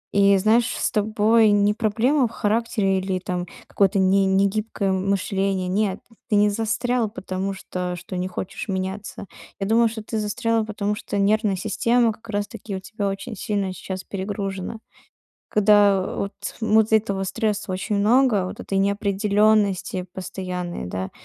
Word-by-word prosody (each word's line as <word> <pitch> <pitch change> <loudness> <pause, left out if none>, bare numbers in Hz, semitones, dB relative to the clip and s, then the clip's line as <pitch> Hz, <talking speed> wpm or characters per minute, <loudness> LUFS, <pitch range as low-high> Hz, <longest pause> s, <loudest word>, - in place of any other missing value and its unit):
И, 200 0 +5
знаешь, 220 +4 +3
с - - 0
тобой 215 +1 +3
не 205 0 +3
проблема 235 +5 +2
в - - -12
характере 210 -3 0
или 190 0 -2
там 180 -1 -4 0.2
какое-то 195 0 +1
не 195 +1 +4
негибкое 200 +1 +1
мышление. 195 0 0
Нет, 195 +1 0 0.3
ты 210 - +2
не 205 0 +5
застрял, 230 +1 0
потому 195 -1 -4
что 180 -2 -4
что 175 +1 -8
не 180 +1 -2
хочешь 185 +3 -6
меняться. 190 +2 -4 0.3
Я 195 - -1
думаю, 230 +2 +4
что 220 -1 -7
ты 220 0 -3
застрял, 225 +1 0
потому 210 -1 -2
что 205 - -4
нервная 205 0 +2
система 230 +4 +1
как 225 +1 -18
раз-таки 205 0 -4
у - - -3
тебя 205 +1 -4
очень 195 +4 -4
сильно 195 -1 -2
сейчас 190 0 -6
перегружена. 195 +1 -4 0.7
Когда, 205 -2 +4
вот, 200 0 -3 0.3
му 220 0 +4
дц 220 - -7
этого 200 -3 +2
стресса 210 0 -2
очень 195 +3 -2
много, 220 -2 +3
вот - - -7
этой 195 - -2
неопределённости 200 -1 +1
постоянной, 180 - -5
да, 95 +1 -4
200 Hz, 150 wpm, -23 LUFS, 190-220 Hz, 0.7 s, И